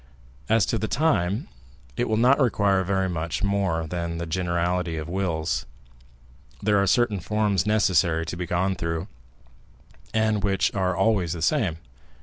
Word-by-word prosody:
As 115 Hz, -3 st, +4 dB
to 115 Hz, -, -1 dB
the 110 Hz, -, -2 dB
time, 120 Hz, -, 0 dB, 0.5 s
it 120 Hz, -1 st, -1 dB
will 110 Hz, -, +1 dB
not 125 Hz, +5 st, +4 dB
require 100 Hz, -7 st, +2 dB
very 95 Hz, 0 st, 0 dB
much 85 Hz, 0 st, -3 dB
more 95 Hz, -5 st, 0 dB
than 85 Hz, 0 st, -4 dB
the 85 Hz, -, -3 dB
generality 85 Hz, 0 st, -1 dB
of 80 Hz, +1 st, -5 dB
wills. 85 Hz, -3 st, -2 dB, 0.9 s
There 105 Hz, -1 st, +2 dB
are 100 Hz, -, +1 dB
certain 115 Hz, -1 st, +2 dB
forms 105 Hz, +1 st, 0 dB
necessary 90 Hz, -6 st, +2 dB
to 85 Hz, -, -5 dB
be 90 Hz, 0 st, -4 dB
gone 95 Hz, +3 st, 0 dB
through, 85 Hz, 0 st, -3 dB, 1.0 s
and 110 Hz, -2 st, +1 dB
which 95 Hz, -1 st, +1 dB
are 95 Hz, -2 st, 0 dB
always 95 Hz, -4 st, +1 dB
the 85 Hz, -2 st, -5 dB
same. 95 Hz, -, +1 dB
95 Hz, 150 wpm, -25 LUFS, 85-105 Hz, 1.0 s, As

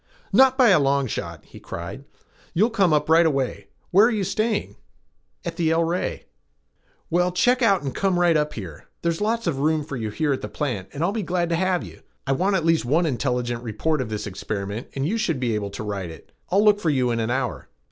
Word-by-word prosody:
"Not 260 Hz, +4 st, +6 dB
by 255 Hz, -4 st, +6 dB
a 185 Hz, -, +6 dB
long 140 Hz, -1 st, +2 dB
shot," 115 Hz, -, -5 dB
he -, -, -13 dB
cried. 85 Hz, +11 st, -7 dB, 0.5 s
"You'll 215 Hz, +8 st, +3 dB
come 195 Hz, -6 st, +3 dB
up 150 Hz, -1 st, +2 dB
right 165 Hz, +2 st, +6 dB
away. 135 Hz, -, -1 dB, 0.2 s
Where 200 Hz, +5 st, +6 dB
are -, -, +2 dB
you 215 Hz, -4 st, -1 dB
staying?" 215 Hz, +3 st, -1 dB, 0.7 s
"At 170 Hz, -1 st, -4 dB
the 165 Hz, -2 st, +1 dB
El 165 Hz, +1 st, +3 dB
Rey." 170 Hz, +2 st, -2 dB, 0.9 s
"Well, 180 Hz, +2 st, +2 dB
check 245 Hz, +8 st, +2 dB
out 200 Hz, -7 st, +3 dB
and 135 Hz, -2 st, -3 dB
come 190 Hz, -2 st, +1 dB
right 175 Hz, -2 st, +4 dB
up 150 Hz, 0 st, 0 dB
here. 85 Hz, -9 st, -8 dB, 0.2 s
There's 170 Hz, +1 st, 0 dB
lots 225 Hz, +2 st, 0 dB
of 155 Hz, -6 st, -1 dB
room 155 Hz, +1 st, +1 dB
for 145 Hz, -2 st, -6 dB
you 110 Hz, -2 st, -3 dB
here 145 Hz, +7 st, 0 dB
at 130 Hz, -, -4 dB
the -, -, -4 dB
plant 120 Hz, -11 st, -3 dB
and 145 Hz, -, -3 dB
I'll 175 Hz, -, +2 dB
be 220 Hz, +1 st, -2 dB
glad 175 Hz, -2 st, -1 dB
to 170 Hz, -, +1 dB
have 185 Hz, +1 st, +1 dB
you. -, -, -12 dB, 0.2 s
I 135 Hz, -, -1 dB
want 190 Hz, +8 st, +1 dB
at 170 Hz, -4 st, 0 dB
least 165 Hz, -1 st, +3 dB
one 155 Hz, +8 st, +2 dB
intelligent 125 Hz, -4 st, -1 dB
report 130 Hz, +7 st, -1 dB
of 120 Hz, -, -4 dB
this 105 Hz, -1 st, -4 dB
experiment 100 Hz, +2 st, -5 dB
and 135 Hz, +1 st, -1 dB
you 225 Hz, +6 st, -1 dB
should 165 Hz, -10 st, 0 dB
be 120 Hz, -3 st, 0 dB
able 105 Hz, -1 st, -2 dB
to 100 Hz, -, -6 dB
write 100 Hz, -4 st, -4 dB
it. 80 Hz, -, -13 dB, 0.2 s
I'll 200 Hz, +3 st, +3 dB
look 210 Hz, -1 st, +5 dB
for 170 Hz, -, 0 dB
you 130 Hz, -4 st, +1 dB
in 115 Hz, -, -1 dB
an 110 Hz, 0 st, -1 dB
hour." 125 Hz, 0 st, -2 dB
155 Hz, 235 wpm, -23 LUFS, 125-185 Hz, 0.9 s, Not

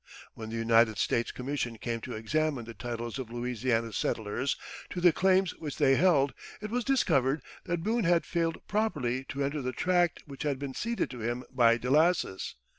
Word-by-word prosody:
When 110 Hz, -1 st, -7 dB
the 115 Hz, -, -5 dB
United 115 Hz, -1 st, +4 dB
States 115 Hz, +4 st, 0 dB
commission 125 Hz, -3 st, -3 dB
came 115 Hz, +1 st, -3 dB
to 125 Hz, -, -6 dB
examine 140 Hz, +3 st, -1 dB
the 115 Hz, -, -8 dB
titles 120 Hz, +1 st, -5 dB
of 125 Hz, -4 st, -5 dB
Louisiana 120 Hz, -1 st, -1 dB
settlers 115 Hz, +5 st, -1 dB, 0.3 s
to 180 Hz, -, -4 dB
the 175 Hz, -2 st, +5 dB
claims 190 Hz, +1 st, +3 dB
which 150 Hz, -4 st, -6 dB
they 135 Hz, -3 st, +4 dB
held, 145 Hz, -6 st, +4 dB, 0.3 s
it 215 Hz, 0 st, -6 dB
was 245 Hz, +1 st, 0 dB
discovered 150 Hz, -, +2 dB, 0.2 s
that 170 Hz, -1 st, -2 dB
Boone 225 Hz, +1 st, +1 dB
had 170 Hz, 0 st, +3 dB
failed 165 Hz, -1 st, -1 dB
properly 140 Hz, -, 0 dB
to 135 Hz, +2 st, -3 dB
enter 140 Hz, +1 st, -1 dB
the 130 Hz, 0 st, -3 dB
tract 175 Hz, +3 st, +1 dB
which 140 Hz, -2 st, -10 dB
had 145 Hz, -3 st, 0 dB
been 140 Hz, -1 st, -5 dB
ceded 230 Hz, -, -2 dB
to 125 Hz, -, -8 dB
him 120 Hz, +2 st, -2 dB
by 115 Hz, -2 st, +4 dB
Delassus. 150 Hz, -, +1 dB
135 Hz, 185 wpm, -29 LUFS, 120-170 Hz, 0.3 s, the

